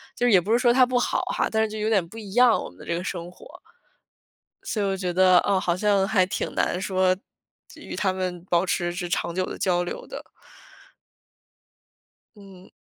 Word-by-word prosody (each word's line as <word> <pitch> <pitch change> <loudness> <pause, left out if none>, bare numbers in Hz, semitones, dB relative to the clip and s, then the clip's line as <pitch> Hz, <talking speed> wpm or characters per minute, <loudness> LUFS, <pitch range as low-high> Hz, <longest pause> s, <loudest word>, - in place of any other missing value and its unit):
就 245 - 0
是 - - +3
也 185 - +6
不 205 +6 -4
是 240 - +4
说 240 -2 +4
他 255 0 +5
不 250 -1 0
好 - - 0
哈， - - +1
但 220 0 +2
是 220 - -1
就 215 - -7
有 215 - -1
点 195 -6 +2
不 225 - -13
一 205 -3 -9
样， 245 -1 +4
我 - - -7
们 - - -20
的 - - -11
这 170 - -2
个 175 - -3
生 175 -2 -5
活。 - - -15 1.2
所 215 - -3
以 - - 0
我 195 0 0
觉 185 -2 -3
得， 185 0 +5
嗯， 195 -2 +1
好 175 -2 0
像 195 0 +2
还 190 -4 +3
挺 185 - -4
难 180 - 0
说 185 -1 +1 0.5
就 - - -15
与 - - -7
他 190 -2 0
们 180 -2 -4
保 175 0 +1
持 175 0 -1
着 175 0 -4
长 170 -1 -2
久 185 0 0
的 - - -7
交 175 -1 +1
流 175 - -6
的。 - - -8 2.1
嗯。 195 -2 -15
190 Hz, 240 characters per minute, -24 LUFS, 180-210 Hz, 2.1 s, 也